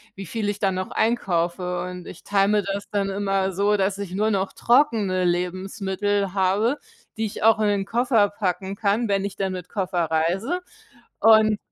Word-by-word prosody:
wie 195 - -7
viel 205 +4 -3
ich 205 - -3
dann 195 -2 +1
noch 185 0 -4
einkaufe. 180 -5 0
Und 180 0 -7
ich 175 - -11
teile 200 -1 +2
mir 210 -1 +2
das 200 +1 -4
dann 200 -1 0
immer 195 -1 -1
so, 205 +2 +2
dass 195 0 0
ich 200 -3 -6
nur 215 +3 +1
noch 195 -2 0
trockene 225 -8 +2
Lebensmittel 190 +2 -1
habe, 205 +8 +1 0.4
die 220 - -1
ich 205 - -7
auch 225 0 +5
in 210 - +3
den 200 -1 0
Koffer 230 -2 +2
packen 195 -1 -3
kann, 210 +3 0
wenn 200 -1 0
ich 200 - -5
dann 190 -1 -1
mit 180 -1 -7
Koffer 180 -3 -1
reise. 185 - 0 0.6
Und 220 -1 +6
195 Hz, 185 wpm, -23 LUFS, 185-210 Hz, 0.6 s, Und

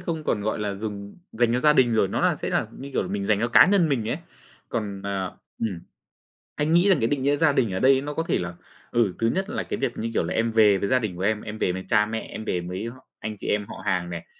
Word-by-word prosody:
không 165 -3 -4
còn, 105 - 0
gọi 110 - -1
là, 105 -1 -2
dùng 100 -1 -6 0.2
dành 115 0 +2
cho 125 - +1
gia 150 +2 +5
đình 125 -5 +4
rồi, 110 -3 +3
nó - - -2
là - - +2
sẽ - - -4
là - - +1
như 140 +1 -8
kiểu 90 - -1
mình 100 +1 -2
dành 105 0 +2
cho 120 - +1
cá 120 - +7
nhân 185 -3 +3
mình 120 -7 0
ấy. 120 - 0 0.5
Còn, 105 -4 -3
ờ, 100 -2 -3 0.2
ừm, 100 -7 -2 0.8
anh 150 +2 0
nghĩ 175 +4 +5
rằng 185 -7 +4
cái 115 - +2
định 135 +1 -1
nghĩa 140 +1 +3
gia 155 +1 +3
đình 130 -7 +1
ở 95 - -1
đây 135 +3 +5
nó 145 +1 -4
có 165 - -1
thể - - +1
là, 90 -1 -5 0.4
ừ, 115 -6 +2
thứ 115 - +2
nhất 190 +2 -1
là 230 - -2
cái - - -4
việc 135 -3 -2
như 115 - -2
kiểu - - +1
là - - -3
em 115 0 +1
về 105 -3 +5
với 100 - -2
gia 130 - +4
đình 110 -7 -3
của 90 - -7
em, 105 +2 +1
em 110 0 -7
về 90 - +1
với 95 +1 -5
cha 105 0 +4
mẹ, 110 +1 -3
em 110 - -8
về 90 - 0
với 90 +5 -5 0.3
anh 110 0 -5
chị - - -8
em 105 0 0
họ - - -8
hàng 90 -3 0
này. 85 -1 -6
110 Hz, 290 wpm, -25 LUFS, 100-135 Hz, 0.8 s, cá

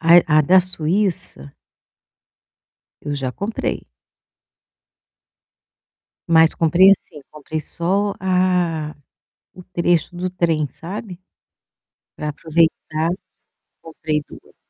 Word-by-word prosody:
A 170 +1 +7 0.2
a - - +7
da 185 +5 +5
Suíça 175 - -1 1.5
eu 145 0 -4
já 135 -2 -3
comprei. 205 - -4 2.4
Mas 160 -1 +5
comprei, 175 +4 +5
assim, 175 -5 -1
comprei 155 +1 -6
só 195 +7 -1
a 180 -4 0 0.6
o 180 - -12
trecho 175 -1 0
do 180 +1 -3
trem, 165 -4 0
sabe, 190 +1 -8 1.0
para 150 - -4
aproveitar 160 +1 0 0.7
comprei 155 -2 -3
2. - - -15
170 Hz, 90 wpm, -20 LUFS, 155-185 Hz, 2.4 s, A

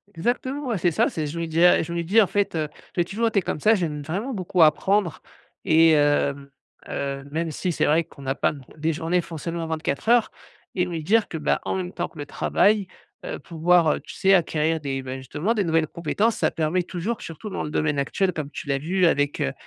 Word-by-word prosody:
Exactement, 260 - -2
ouais, 225 -5 0
c'est 175 0 +1
ça. - - +2
C'est, 155 -2 -3
je 170 +3 -5
me 165 - -2
dis: 165 +2 +1
«Ah!», 180 - +6
je 170 - -6
me 170 0 -1
dis 210 +7 +4
en 195 - +3
fait, 205 -4 0
heu: 155 -1 -1 0.3
«J'ai 175 - +3
toujours 225 +5 -1
été 205 -3 +1
comme 155 - -3
ça», 215 +8 +4
j'aime 155 -6 -2
vraiment 200 - -3
beaucoup 185 -2 0
apprendre 175 +3 +3 0.4
et 165 +1 +6
hem, 145 -2 +2 0.4
heu, 140 0 -3
même 165 +1 -2
si 180 +4 -2
c'est - - 0
vrai 160 +3 +3
qu'on 140 -2 -14
a 135 +1 -1
pas, - - +1
non 140 -3 -11
plus 150 - -19
des 160 +1 0
journées 170 +3 0
font 165 -1 -8
seulement 165 +1 -4
24 160 +3 -3
heures 240 -2 +4 0.5
et 180 -1 +1
lui 165 -3 -4
dire 220 +6 +3
que, 160 - -4
bah, 150 - 0
en - - -2
même 185 -1 -4
temps, 175 0 -2
que - - -15
le 145 - -4
travail, 200 +6 +2 0.4
heu, - - -5
pouvoir, 170 -1 +3
heu, - - -4
tu - - -11
sais, 195 0 +3
acquérir 160 -2 +2
des, 135 -2 -3
ben, 130 0 -6
justement, 145 - -2
des 210 -4 0
nouvelles 165 -2 +1
compétences, 205 +7 0
ça - - +1
permet 165 +3 0
toujours, 190 +7 -4
surtout 165 +6 -8
dans - - -4
le - - -4
domaine 150 -2 0
actuel, 180 +6 0
comme 150 -2 -4
tu - - -7
l'as 140 -1 0
vu 180 +4 +1
avec, 145 -3 +1
heu, 65 - -1
165 Hz, 240 wpm, -24 LUFS, 150-190 Hz, 0.5 s, Ah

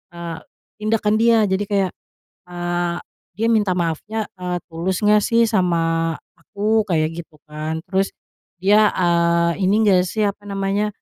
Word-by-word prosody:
eee, 170 -1 -6 0.4
tindakan 215 0 +1
dia, 230 -1 +4
jadi 195 0 0
kayak, 195 -3 +1 0.6
eee, 175 0 -2 0.4
dia 220 +5 -1
minta 210 -5 +2
maafnya, 180 +6 -2
eee, 180 -1 -3
tulus 170 +3 -2
nggak 210 0 +4
sih 230 -1 +3
sama 165 -4 +1 0.2
aku, 215 +1 0
kaya 160 -5 +1
gitu 165 -1 -9 0.2
kan? 155 +1 -4
Terus, 195 0 0 0.5
dia, 210 +2 +5
eee, 170 0 +2
ini 215 +3 +3
enggak 185 -3 +4
sih, 215 +3 -1
apa 205 0 -3
namanya, 200 +1 -1
190 Hz, 140 wpm, -20 LUFS, 170-210 Hz, 0.6 s, dia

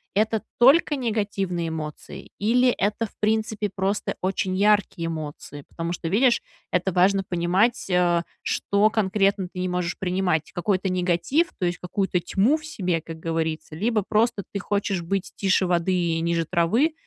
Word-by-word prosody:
это 220 +1 +1 0.2
только 290 +4 +5
негативные 200 -8 -2
эмоции, 155 -2 -7
или 245 +5 +3
это, 210 +3 -1
в - - -11
принципе, 215 0 0
просто 195 +2 -1
очень 185 0 -1
яркие 200 -4 +2
эмоции? 150 -2 -6
Потому 165 0 -4
что, 165 - -5
видишь, 235 +7 +3 0.3
это 180 +1 +1
важно 195 +2 +3
понимать, 185 +7 +1
э, 175 -1 +2 0.2
что 205 +2 +1
конкретно 195 -3 +1
ты 185 - -8
не 185 - -1
можешь 180 -1 -2
принимать, 180 -4 0
какой-то 190 +2 0
негатив, 185 - +1
то 180 - 0
есть, 175 0 -1
какую-то 180 0 -1
тьму 205 - +2
в 310 - -12
себе, 185 - -2
как 160 0 -9
говорится, 160 -1 -3
либо 215 +4 0
просто 215 -2 +1
ты 200 - -3
хочешь 200 -3 -1
быть 195 +3 -2
тише 190 -1 +2
воды 175 +1 +1
и 170 -2 0
ниже 170 0 0
травы, 185 - +2
190 Hz, 160 wpm, -24 LUFS, 175-210 Hz, 0.3 s, только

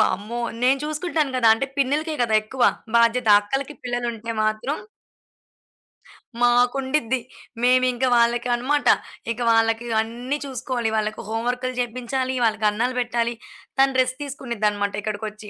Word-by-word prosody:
వామ్మో! 215 +5 0 0.2
నేను 265 +2 +4
చూసుకుంటాను 310 -2 -1
కదా, 230 -3 +4
అంటే 275 +4 -2
పిన్నిలకే 295 +4 0
కదా! 225 -2 +1
ఎక్కువ, 250 +4 -4 0.3
బాధ్యత 235 0 +3
అక్కలకి 270 +7 -3
పిల్లలు 245 0 -2
ఉంటే 230 +1 -6
మాత్రం 215 +7 -1 1.7
మాకుండిద్ది 250 +1 +2 0.4
మేమింక 255 0 +3
వాళ్ళకి 235 +1 +2
అనమాట 285 +4 0 0.5
ఇక 230 - -5
వాళ్ళకి 225 +1 +2 0.2
అన్ని 245 +5 -4
చూసుకోవాలి 250 -3 -2
వాళ్ళకి 215 0 -2
హోంవర్కులు 245 +3 -2
చేపించాలి, 255 +2 -2
వాళ్ళకి 215 -1 +1
అన్నలు 245 +4 -1
పెట్టాలి 240 -1 0 0.5
తను 270 0 +4
రెస్ట్ 255 +2 -2
తీసుకోనిది 240 -6 -2
అన్నమాట 205 -1 -2
ఇక్కడికొచ్చి. 215 0 -5
245 Hz, 125 wpm, -23 LUFS, 225-260 Hz, 1.7 s, నేను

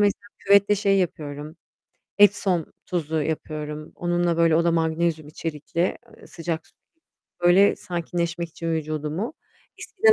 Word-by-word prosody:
mesela 205 -1 +2 0.2
küvette 200 +1 +5
şey 195 -1 +2
yapıyorum, 150 -3 -3 0.6
epsom 195 -4 +4 0.2
tuzu 160 -3 -1
yapıyorum. 155 -1 -4
Onunla 175 -1 0
böyle 165 -1 +4
o 170 - +3
da 170 - +3
magnezyum 160 -1 0
içerikli, 165 +3 -2 0.2
eee, - - -15
sıcak 165 -1 -4 0.7
böyle 185 +3 +6
sakinleşmek 170 -1 -3
için 165 +1 -3
vücudumu, 155 - -3 0.4
eskiden 440 +3 +3
170 Hz, 120 wpm, -24 LUFS, 155-185 Hz, 0.7 s, böyle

